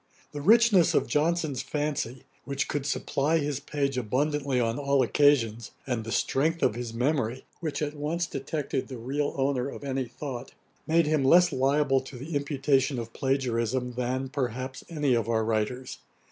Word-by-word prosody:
The 145 -1 -5
richness 215 0 +5
of - - +3
Johnson's 155 -3 0
fancy, 145 -5 -3 0.2
which 140 0 -2
could 145 -1 -2
supply 150 +2 +1
his 145 -3 -1
page 140 -2 -1
abundantly 135 +3 0
on 115 +2 0
all 140 -1 +2
occasions, 120 -3 +2 0.2
and 120 -4 -2
the 115 - -6
strength 160 +7 +1
of - - +3
his 120 0 -5
memory, 125 0 -1
which 155 -2 -3
at 145 0 -2
once 155 +4 -1
detected 140 -2 -3
the 130 - -7
real 140 +5 -2
owner 135 -1 0
of 140 - -9
any 135 -1 -1
thought, 125 +1 -7 0.3
made 165 +1 +4
him 150 -2 +1
less 175 +6 +6
liable 135 0 +2
to 130 0 -10
the 145 +5 -6
imputation 140 -1 +1
of 115 -1 -6
plagiarism 125 -2 -1
than, 125 +2 -2
perhaps, 130 -1 -3
any 150 -5 +1
of 115 -2 0
our 110 -1 +1
writers. 115 +4 -2
135 Hz, 165 wpm, -27 LUFS, 125-150 Hz, 0.3 s, less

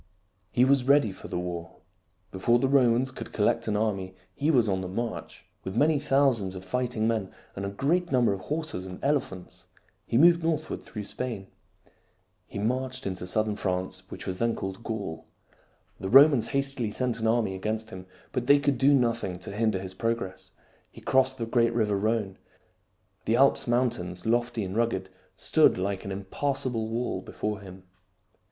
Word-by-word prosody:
He 125 - +3
was 135 -1 +3
ready 140 -6 +4
for 95 - -10
the - - -3
war. 85 -1 -5 0.6
Before 120 +6 +2
the 135 - +1
Romans 130 -1 +3
could - - -8
collect - - +1
an 105 - +1
army 95 -4 -2 0.2
he 145 +8 -1
was 125 -8 +4
on 95 -2 0
the 95 - -4
march. 115 +5 -5 0.2
With 95 +3 -5
many 150 +2 +4
thousands 135 -9 +2
of 95 0 -8
fighting 120 +1 -1
men 110 -4 -1 0.2
and 100 0 -3
a - - -3
great 170 - 0
num 125 -2 +3
ber 100 - +3
of 95 - -5
horses 150 - -4
and 90 -1 -7
elephants, 95 -10 -2 0.4
he 115 - +1
moved 170 +4 +6
northward 160 -2 -2
through 105 -2 -7
Spain. 105 -2 -5 1.0
He - - -8
marched 130 +5 -2
into 90 -1 -4
southern 110 +2 0
France, 95 0 -3
which - - -8
was 95 -1 -4
then 115 0 +1
called 95 +3 -6
Gaul. 105 -8 -5 0.7
The 95 - -4
Romans 135 -1 +7
hastily 135 -4 -1
sent 125 +1 -2
an 110 - 0
army 110 -3 +1
against 110 +3 -3
him, 95 0 -9 0.2
but 125 -1 -2
they 140 - +7
could 140 -3 0
do 140 +3 +5
nothing 115 -7 0
to 90 - -8
hinder 110 0 +1
his 95 0 -7
progress. 95 -4 -3 0.4
He - - -14
crossed 130 0 +2
the 115 - -2
great 115 0 +2
river 105 -3 +2
Rhone. 105 -1 -1 0.9
The - - +2
Alps - - +3
mountains, 115 -8 -1
lofty 120 0 0
and 95 +1 -5
rugged, 110 -5 0 0.2
stood - - +4
like 95 +1 -2
an 100 - -5
impassable 115 +3 -2
wall 115 -4 -2
before 105 +2 -4
him. 95 -1 -12
110 Hz, 175 wpm, -27 LUFS, 95-130 Hz, 1.0 s, Romans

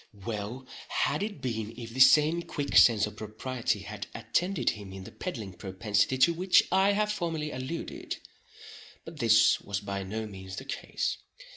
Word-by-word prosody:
Well 115 +3 -4 0.2
had 150 - 0
it 205 0 -4
been 115 -3 -3
if 115 -2 -7
the 130 - -6
same 150 +5 +6
quick 145 -4 -4
sense 110 -3 +7
of 105 - -8
propriety 110 0 -3
had 105 +1 -7
attended 180 +1 0
him 100 -3 -9
in 95 0 -8
the - - -10
peddling 110 - -6
propensity 100 +6 0
to 170 +6 +5
which 180 +2 +4
I 190 +2 +4
have 210 +1 +1
formerly 165 -6 -2
alluded—but 150 +3 -9
this 115 -1 +5
was 100 -1 -3
by 100 -1 -4
no 110 +4 -4
means 95 -2 -8
the 135 - -7
case. 135 - -3
120 Hz, 160 wpm, -29 LUFS, 105-155 Hz, 0.2 s, sense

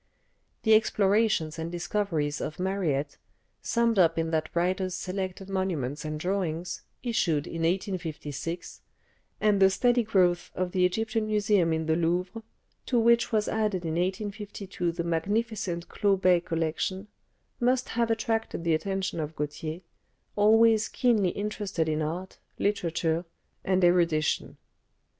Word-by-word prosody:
The 220 - +5
explorations 205 -6 +2
and 165 +1 -4
discoveries 170 -4 -1
of 155 - -5
Mariette, 170 -7 -1 0.4
summed 235 -3 +1
up 165 -2 +4
in 165 0 0
that 160 -1 0
writer's 185 +1 0
"Selected 185 0 -4
Monuments 175 -8 -2
and 155 0 -4
Drawings," 175 -1 -2 0.2
issued 170 - +1
in 165 -1 -5
1856, 165 -2 -3 0.6
and 210 -2 +3
the 190 0 +7
steady 245 +5 +3
growth 185 -5 +2
of 185 -1 -1
the 180 0 +3
Egyptian 220 +4 -1
Museum 205 -5 +2
in 160 0 0
the 160 0 +2
Louvre, 180 +6 -1 0.5
to 250 - +1
which 235 +1 +4
was 215 -2 +1
added 210 -5 0
in 160 -1 -2
1852 195 0 -3
the 170 0 -3
magnificent 180 +1 -1
Clot 200 -3 +1
Bey 180 -1 +5
collection, 170 +4 -2 0.5
must 250 +1 +1
have 235 0 0
attracted 225 -4 -1
the 165 -1 +2
attention 190 +2 -1
of 155 0 -4
Gautier, 155 +3 -4 0.5
always 220 +1 +5
keenly 220 -7 +2
interested 200 -4 -2
in 155 0 0
art, 170 +5 -4 0.2
literature, 170 -4 0 0.4
and 185 -1 +1
erudition. 170 -3 +2
185 Hz, 130 wpm, -28 LUFS, 165-210 Hz, 0.6 s, the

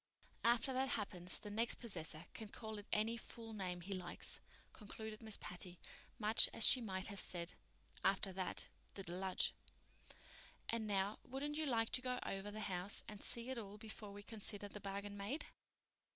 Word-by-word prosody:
After 235 +3 +5
that 260 +1 +3
happens 180 -5 -1
the 210 - -6
next 230 +3 +5
possessor 165 -8 -4
can 220 -2 -6
call 220 -1 -5
it 205 - -9
any 225 +2 +3
fool 225 0 -6
name 180 -4 -2
he 195 +3 -3
likes," 180 -2 -1 0.3
concluded 215 +1 -6
Miss 220 -2 -1
Patty, 180 0 -2 0.4
much 215 +1 +6
as 225 - +7
she 255 - +10
might 190 -4 -1
have 200 -2 -2
said, 170 -1 +1 0.5
"After 195 0 +4
that—the 190 +1 -3
deluge." 185 +1 +1 1.1
"And 225 -1 0
now, 200 +1 +2
wouldn't 290 +4 -2
you 310 - +2
like 225 -3 +3
to 255 - +1
go 250 -1 0
over 195 +1 -1
the 215 +1 -4
house 185 0 -1
and 210 -1 -6
see 235 +2 +1
it 260 - -1
all 205 -1 -6
before 215 -1 -6
we 205 0 -7
consider 205 -1 -1
the 210 0 -7
bargain 200 +1 -3
made?" 205 +10 -1
210 Hz, 170 wpm, -41 LUFS, 195-230 Hz, 1.1 s, she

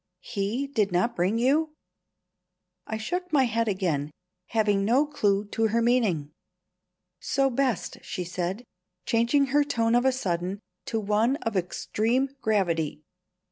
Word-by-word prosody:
He 210 +7 -2
did 220 -8 0
not 180 +7 +1
bring 185 +6 +1
you?" 300 +6 +2 1.1
I 220 - -3
shook 360 +11 -3
my 285 -4 +4
head 230 -1 0
again, 175 -8 -1 0.4
having 210 -3 +1
no 250 +8 +3
clue 205 -8 +1
to 225 +1 +1
her 225 +2 +1
meaning. 220 - +1 0.9
"So 270 0 +1
best," 250 -5 -1
she 180 - -4
said, 180 +5 -3 0.4
changing 235 +5 +3
her 295 0 +5
tone 230 -5 0
of 245 +1 +3
a 265 - +5
sudden 185 -5 -2 0.3
to 225 - -1
one 215 +5 +2
of 225 -2 -2
extreme 225 +8 0
gravity. 170 -8 0
225 Hz, 140 wpm, -26 LUFS, 195-255 Hz, 1.1 s, her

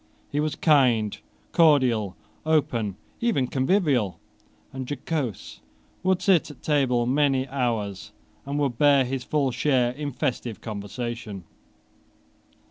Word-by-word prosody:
He 145 - -1
was 150 0 -1
kind, 125 - +3 0.4
cordial, 125 - +3 0.3
open, 120 -10 +1 0.2
even 230 - +1
convivial 130 - +1 0.5
and 130 -1 -6
jocose, 145 - -4 0.4
would 185 0 +1
sit 185 -6 +3
at 145 -4 -13
table 130 -5 +2
many 135 0 +2
hours, 115 -7 -2 0.3
and 140 +1 -4
would 140 -5 -1
bear 140 -3 +5
his 130 0 -3
full 140 -2 0
share 125 -1 +2
in 145 +2 -5
festive 125 -4 -3
conversation. 110 -1 -6
130 Hz, 115 wpm, -25 LUFS, 120-145 Hz, 0.5 s, bear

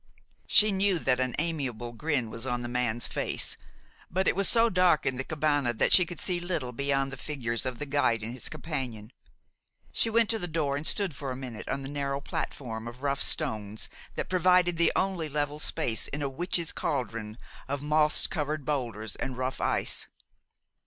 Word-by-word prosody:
She 215 0 +8
knew 195 -1 +2
that 130 -5 +1
an 130 -1 0
amiable 135 -8 -2
grin 125 -2 -1
was 115 +3 -6
on 125 -1 -1
the - - -3
man's 120 -1 0
face; - - -1 0.5
but 190 +2 0
it - - +3
was 195 0 +2
so 230 0 +4
dark 180 -7 +3
in 130 -1 +1
the 135 - 0
cabane 145 -6 0
that - - +4
she 180 -2 +7
could 175 -3 -7
see 180 +1 0
little 170 -8 -2
beyond 135 +1 0
the 135 - -6
figures 125 -4 -3
of 125 -2 -3
the 150 - -3
guide 135 -6 +1
and 115 +2 -4
his 125 - -4
companion. 125 -8 -5 0.8
She 230 - +2
went 230 0 +3
to 225 - 0
the 175 - -4
door, 155 -4 0
and 145 +2 -2
stood 195 -8 +1
for 135 +1 -5
a 130 - -3
minute 125 -4 -7
on 135 0 -2
the - - -5
narrow 140 -1 -2
platform 115 -5 -4
of 120 +3 -9
rough 140 -1 0
stones 110 -9 0 0.3
that - - -2
provided 180 -1 +3
the 170 - +5
only 185 -5 0
level 145 0 -2
space 140 -8 +1
in 145 +1 -4
a 140 - 0
witches' 170 +3 -1
cauldron 115 -6 -3 0.3
of 140 +1 -3
moss 150 0 +4
covered 150 -3 -2
boulders 115 -7 -2
and 130 -1 -4
rough 130 +1 -2
ice. - - 0
140 Hz, 195 wpm, -29 LUFS, 125-165 Hz, 0.8 s, She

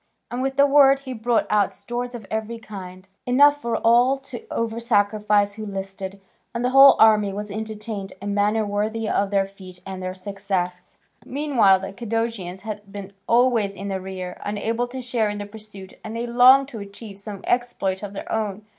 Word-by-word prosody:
And 245 +1 -3
with 270 0 -2
the 280 - +6
word 275 -1 +5
he 260 -2 -6
brought 235 0 +1
out 205 -2 +2
stores 245 +1 -5
of 225 -4 -8
every 220 +1 -3
kind, 185 -4 -10 0.2
enough 285 +3 +5
for 235 0 -1
all 245 +4 +4
to 270 -3 -10
over 230 0 -2
sacrifice 210 -2 +2
who 215 +1 -7
listed; 195 0 -6 0.4
and 235 +1 -1
the 250 - +1
whole 270 +1 +9
army 215 -2 +5
was 205 +1 -6
entertained 215 -1 -5
in 205 - -5
a - - -1
manner 210 +2 +1
worthy 215 +2 -2
of 200 -2 +1
their 195 -1 +2
feat 190 -2 -13
and 190 -1 -6
their 185 0 -4
success. 185 -2 -4 0.3
Meanwhile 255 -10 +3
the 195 0 -6
Cadousians 225 -5 -3
had 210 -2 -7
been 200 -1 -8
always 235 -4 +3
in 200 +2 -6
the 190 -1 -3
rear, 185 -1 -7
unable 225 +4 -2
to 255 +1 -7
share 235 -3 0
in 205 - -4
the 205 - -5
pursuit, 205 -2 -11
and 220 +1 -6
they 235 +1 -2
longed 255 +3 +6
to 230 - -8
achieve 200 0 -10
some 200 -1 -8
exploit 240 -6 -1
of 205 -1 -6
their 195 - -7
own. 210 -2 -2
210 Hz, 190 wpm, -23 LUFS, 195-235 Hz, 0.4 s, whole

